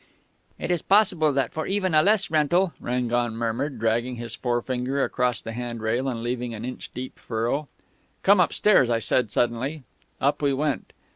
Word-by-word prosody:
"'It -, -, -3 dB
is 175 Hz, -3 st, +1 dB
possible 190 Hz, -7 st, +3 dB
that 135 Hz, -1 st, -1 dB
for 155 Hz, -, -3 dB
even 190 Hz, -3 st, 0 dB
a 155 Hz, -, +6 dB
less 200 Hz, -1 st, +2 dB
rental 165 Hz, +4 st, +2 dB
' -, -, -35 dB
"Rangon 120 Hz, -1 st, 0 dB
murmured, 120 Hz, +4 st, -2 dB
dragging 115 Hz, +3 st, 0 dB
his 120 Hz, -1 st, -2 dB
forefinger 125 Hz, +3 st, -1 dB
across 125 Hz, -3 st, 0 dB
the 115 Hz, -, -5 dB
hand 120 Hz, 0 st, -5 dB
rail 115 Hz, +4 st, -1 dB
and 115 Hz, -3 st, -3 dB
leaving 120 Hz, -1 st, -3 dB
an 110 Hz, +2 st, -6 dB
inch 125 Hz, -, -7 dB
deep 130 Hz, +1 st, -7 dB
furrow.... 120 Hz, +6 st, -2 dB, 0.6 s
"'Come 200 Hz, 0 st, +5 dB
upstairs,' 180 Hz, -, +4 dB, 0.2 s
said 125 Hz, -, +3 dB
I -, -, -18 dB
suddenly.... 125 Hz, +7 st, -1 dB, 0.4 s
"Up 140 Hz, +3 st, +1 dB
we 140 Hz, -1 st, +2 dB
went. 145 Hz, 0 st, -2 dB
125 Hz, 175 wpm, -25 LUFS, 120-155 Hz, 0.6 s, a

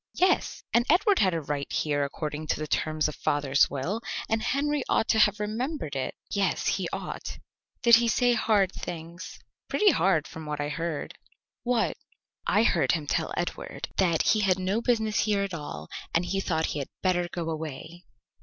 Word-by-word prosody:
"Yes." 370 Hz, 0 st, +1 dB
"And 235 Hz, -, +5 dB
Edward 390 Hz, +5 st, +4 dB
had 185 Hz, -4 st, +3 dB
a -, -, 0 dB
right 145 Hz, -1 st, -4 dB
here 145 Hz, -2 st, 0 dB
according 150 Hz, +2 st, -4 dB
to -, -, 0 dB
the 155 Hz, -, -2 dB
terms 155 Hz, 0 st, 0 dB
of 150 Hz, -, -4 dB
father's 145 Hz, -1 st, +2 dB
will, 165 Hz, +12 st, -3 dB, 0.3 s
and 220 Hz, 0 st, 0 dB
Henry 290 Hz, +3 st, 0 dB
ought -, -, +2 dB
to 220 Hz, -, +4 dB
have 210 Hz, -1 st, +4 dB
remembered 215 Hz, -, -3 dB
it." 135 Hz, -, -2 dB, 0.2 s
"Yes, 200 Hz, -1 st, 0 dB
he -, -, 0 dB
ought." -, -, -5 dB, 0.5 s
"Did 235 Hz, -1 st, +8 dB
he 235 Hz, 0 st, +1 dB
say 245 Hz, +2 st, +3 dB
hard 210 Hz, -5 st, +2 dB
things?" 170 Hz, 0 st, -7 dB, 0.3 s
"Pretty 420 Hz, -2 st, +4 dB
hard 180 Hz, -5 st, +2 dB
from 160 Hz, -1 st, -9 dB
what 150 Hz, -1 st, -3 dB
I 145 Hz, 0 st, -1 dB
heard." 165 Hz, 0 st, -4 dB, 0.4 s
"What?" 240 Hz, -2 st, 0 dB, 0.5 s
"I 210 Hz, -, +4 dB
heard 180 Hz, -7 st, +3 dB
him 160 Hz, -3 st, -1 dB
tell -, -, -1 dB
Edward -, -, -4 dB
that 170 Hz, -4 st, +3 dB
he 215 Hz, -, +3 dB
had 190 Hz, -3 st, +3 dB
no 190 Hz, +4 st, 0 dB
business 220 Hz, -3 st, +1 dB
here 205 Hz, -2 st, +2 dB
at 195 Hz, -2 st, -4 dB
all, 80 Hz, -, -6 dB, 0.3 s
and 170 Hz, +2 st, +2 dB
he 195 Hz, +2 st, -1 dB
thought 160 Hz, -4 st, 0 dB
he 150 Hz, -, -3 dB
had 140 Hz, -, -4 dB
better 175 Hz, -2 st, +2 dB
go 170 Hz, -2 st, -3 dB
away." 160 Hz, +2 st, -6 dB
180 Hz, 185 wpm, -27 LUFS, 155-220 Hz, 0.5 s, Did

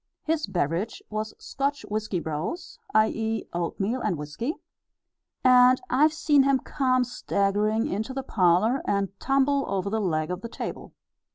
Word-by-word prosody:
His 315 Hz, -1 st, 0 dB
beverage 175 Hz, +5 st, -2 dB
was 215 Hz, 0 st, -3 dB
Scotch 280 Hz, +1 st, -3 dB
whiskey 215 Hz, -3 st, -2 dB
brose, 160 Hz, -, -5 dB, 0.2 s
i.e., 220 Hz, +1 st, +1 dB
oatmeal 195 Hz, +8 st, -2 dB
and 195 Hz, -6 st, 0 dB
whiskey; 150 Hz, -, -4 dB, 0.9 s
and 255 Hz, 0 st, +6 dB
I've 300 Hz, +5 st, +4 dB
seen 300 Hz, -2 st, +3 dB
him 275 Hz, 0 st, +3 dB
come 255 Hz, -2 st, +1 dB
staggering 215 Hz, -2 st, 0 dB
into 220 Hz, +7 st, -3 dB
the 270 Hz, 0 st, -4 dB
parlour 210 Hz, +4 st, +2 dB
and 200 Hz, -1 st, 0 dB
tumble 275 Hz, +1 st, +2 dB
over 200 Hz, 0 st, -2 dB
the 220 Hz, 0 st, 0 dB
leg 155 Hz, -4 st, -1 dB
of 180 Hz, +1 st, -4 dB
the 230 Hz, -, -6 dB
table. -, -, -6 dB
220 Hz, 145 wpm, -26 LUFS, 195-265 Hz, 0.9 s, and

